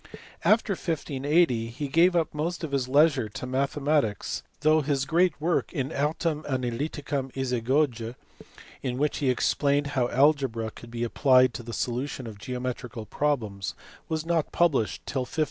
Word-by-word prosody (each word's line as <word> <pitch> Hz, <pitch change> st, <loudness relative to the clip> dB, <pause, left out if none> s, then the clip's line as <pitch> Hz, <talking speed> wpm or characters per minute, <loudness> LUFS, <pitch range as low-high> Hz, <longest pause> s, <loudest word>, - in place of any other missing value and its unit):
After 215 Hz, -2 st, +3 dB
1580 145 Hz, -6 st, +1 dB
he 145 Hz, +6 st, -5 dB
gave 170 Hz, +6 st, +4 dB
up 165 Hz, -3 st, +1 dB
most 165 Hz, +4 st, -3 dB
of 155 Hz, -, -3 dB
his 135 Hz, -2 st, 0 dB
leisure 145 Hz, -5 st, +4 dB
to 105 Hz, -, -6 dB
mathe 135 Hz, +3 st, -1 dB
matics, 140 Hz, -8 st, 0 dB, 0.2 s
though 155 Hz, +1 st, +4 dB
his 140 Hz, -2 st, 0 dB
great 170 Hz, +2 st, +2 dB
work 165 Hz, +3 st, 0 dB
In 135 Hz, -3 st, -2 dB
Artem 150 Hz, +2 st, 0 dB
Analyticam 135 Hz, +2 st, -2 dB
Isagoye 125 Hz, -1 st, 0 dB, 0.7 s
in 125 Hz, -2 st, -2 dB
which 150 Hz, +2 st, 0 dB
he 140 Hz, -3 st, +1 dB
explained 140 Hz, +3 st, +2 dB
how 125 Hz, -3 st, +2 dB
algebra 130 Hz, -5 st, +2 dB
could 120 Hz, -, -12 dB
be 120 Hz, 0 st, -3 dB
applied 130 Hz, +1 st, +4 dB
to 125 Hz, -, -5 dB
the 115 Hz, 0 st, -8 dB
solution 125 Hz, +3 st, -3 dB
of 110 Hz, -3 st, -8 dB
geometrical 125 Hz, -1 st, -5 dB
problems 105 Hz, -11 st, -2 dB, 0.3 s
was 160 Hz, 0 st, -2 dB
not 165 Hz, -2 st, 0 dB
published 150 Hz, -11 st, +1 dB
till 135 Hz, -, -2 dB
1591. 130 Hz, +5 st, -6 dB
140 Hz, 155 wpm, -27 LUFS, 125-155 Hz, 0.7 s, gave